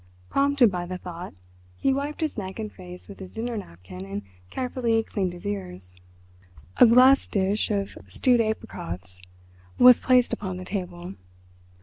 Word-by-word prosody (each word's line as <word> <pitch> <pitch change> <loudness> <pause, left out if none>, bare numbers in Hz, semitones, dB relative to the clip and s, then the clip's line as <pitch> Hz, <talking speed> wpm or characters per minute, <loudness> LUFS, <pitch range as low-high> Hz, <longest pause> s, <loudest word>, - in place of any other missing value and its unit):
Prompted 275 -5 +4
by 175 -1 -3
the 185 +1 -4
thought, 180 - -8 0.4
he 270 - +2
wiped 285 +3 -3
his 315 -2 -1
neck 190 -3 -5
and 215 -2 -5
face 180 -1 -11
with 200 - -11
his 190 -2 -10
dinner 235 +1 -3
napkin 90 - -9
and 100 +1 -5 0.3
carefully 240 - 0
cleaned 190 -5 -2
his 175 - -11
ears. 90 -2 -5 0.8
A 245 - +8
glass 255 +4 +6
dish 200 +1 0
of 200 -2 -2
stewed 245 -3 +3
apricots 90 - -5 0.6
was 250 -1 +8
placed 250 -1 +3
upon 185 -3 -4
the 185 - -7
table. 180 -2 -5
195 Hz, 150 wpm, -25 LUFS, 175-240 Hz, 0.8 s, A